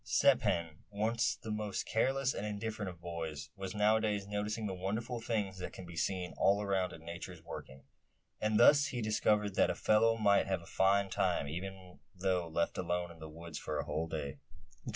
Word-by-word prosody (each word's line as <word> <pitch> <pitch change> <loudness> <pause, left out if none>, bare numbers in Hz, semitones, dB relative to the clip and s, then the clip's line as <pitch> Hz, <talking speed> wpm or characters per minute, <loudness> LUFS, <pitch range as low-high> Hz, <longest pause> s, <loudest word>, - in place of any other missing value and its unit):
Step - - +4
Hen, 85 -2 -1
once 110 +3 +1
the 110 - -7
most 105 -2 -2
careless 135 +3 +1
and - - -4
indifferent 105 -1 -3
of 85 -2 -10
boys, 80 -4 -5
was 95 0 -5
nowadays 105 -1 +2
noticing 105 +2 -2
the 100 - -2
wonderful 110 +6 -3
things 105 -5 -1
that 90 - -5
can 95 - -8
be 85 -1 -10
seen 90 +1 -1
all 100 +1 +4
around 95 -3 0
in 80 0 -11
Nature's 85 0 -7
working; 65 -4 -9 0.6
and 110 0 +2
thus 145 +4 +7
he 130 -3 -3
discovered 105 -2 +2
that - - +3
a - - 0
fellow 115 +1 +4
might 100 -3 +4
have 95 -3 -1
a - - -12
fine 100 +3 +3
time, 95 -6 0
even 90 +3 -7 0.2
though 90 -2 0
left 85 +1 -1
alone 90 -1 -1
in 85 - -14
the 80 0 -8
woods 85 0 -8
for 75 - -3
a - - -2
whole 80 +2 -2
day! 75 -4 -4
95 Hz, 195 wpm, -34 LUFS, 85-105 Hz, 0.6 s, thus